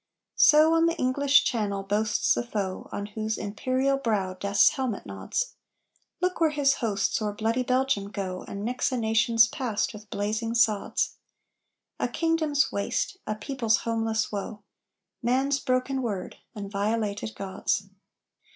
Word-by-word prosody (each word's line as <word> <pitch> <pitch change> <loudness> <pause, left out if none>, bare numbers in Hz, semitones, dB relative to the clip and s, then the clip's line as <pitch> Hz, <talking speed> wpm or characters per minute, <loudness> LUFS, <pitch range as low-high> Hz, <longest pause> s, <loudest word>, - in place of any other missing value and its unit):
So 310 +2 +7
on 330 0 +4
the 335 0 -1
English 280 +2 +3
Channel 205 -5 -1
boasts 210 +2 +1
the - - -1
foe 205 -6 -4
On 205 - -4
whose 215 +1 -3
imperial 255 +6 0
brow 205 -7 0
death's 200 +2 +4
helmet 260 -8 -3
nods. 100 - -3 0.7
Look 365 -1 0
where 320 - +5
his 285 -2 +2
hosts 210 -2 0
o'er 210 -1 -1
bloody 225 +4 0
Belgium 255 -5 +1
go, 190 -3 -4
And 200 +1 -5
mix 250 +3 0
a 255 - -1
nation's 225 0 +4
past 230 -4 -2
with 210 -1 -12
blazing 220 +4 -2
sods! 220 -3 +1 0.8
A - - +1
kingdom's 315 -3 +1
waste! 200 - -2
a 215 - -1
people's 225 0 0
homeless 225 -1 0
woe! 205 0 -5 0.6
Man's 270 +3 +1
broken 255 +1 0
Word, 205 -7 -4 0.2
and 200 -2 -6
violated 210 +1 -1
gods! 195 0 -2
225 Hz, 140 wpm, -27 LUFS, 205-265 Hz, 0.8 s, So